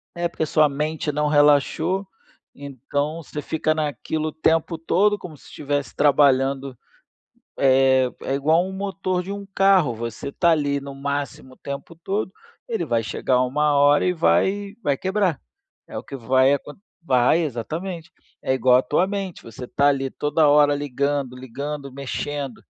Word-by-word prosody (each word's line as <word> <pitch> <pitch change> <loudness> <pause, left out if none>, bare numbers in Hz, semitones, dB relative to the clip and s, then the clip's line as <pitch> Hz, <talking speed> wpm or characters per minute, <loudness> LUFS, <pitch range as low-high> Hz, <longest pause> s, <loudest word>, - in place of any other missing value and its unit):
É, 175 0 -1
porque 170 -2 -3
sua 155 0 +3
mente 150 +2 -2
não 150 +1 0
relaxou, 150 +6 +3 0.5
então, 145 +3 -4
você 150 +1 -6
fica 155 +1 0
naquilo 155 0 -3
o - - -3
tempo 160 +1 +1
todo 200 +6 +2
como 175 -6 -10
se - - -20
estivesse 145 0 -4
trabalhando, 135 -2 +2 0.8
eh, 130 -1 +4
é 135 - -2
igual 155 +5 +2
um 190 - -6
motor 190 -1 -2
de 185 +2 -6
um 200 0 -6
carro, 195 -10 +3
você 115 +4 -5
tá 170 +4 +2
ali 145 -3 0
no 140 0 -8
máximo 140 -2 -4
o - - -28
tempo 140 +4 -8
todo, 190 +3 -3 0.4
ele 455 -2 -2
vai 115 -1 0
chegar 125 +3 0
uma 145 +4 +1
hora 145 +1 +4
e 180 - +2
vai 195 +4 +1
vai 145 -10 0
quebrar. 190 -2 0 0.5
É - - -6
o - - -8
que - - -10
vai 130 +2 +3
aco 145 +1 -6 0.3
vai 130 +1 +3
exatamente. 160 - -5 0.3
É 130 - 0
igual 130 -1 +4
a 130 - +3
tua 180 +8 +1
mente, 195 -3 -5
você 115 +2 -9
tá 140 +3 +2
ali 135 -1 0
toda 150 +3 +1
hora 145 0 +5
ligando, 140 -2 -2
ligando, 140 +3 -6
mexendo. 140 -1 -5
145 Hz, 165 wpm, -22 LUFS, 135-165 Hz, 0.8 s, hora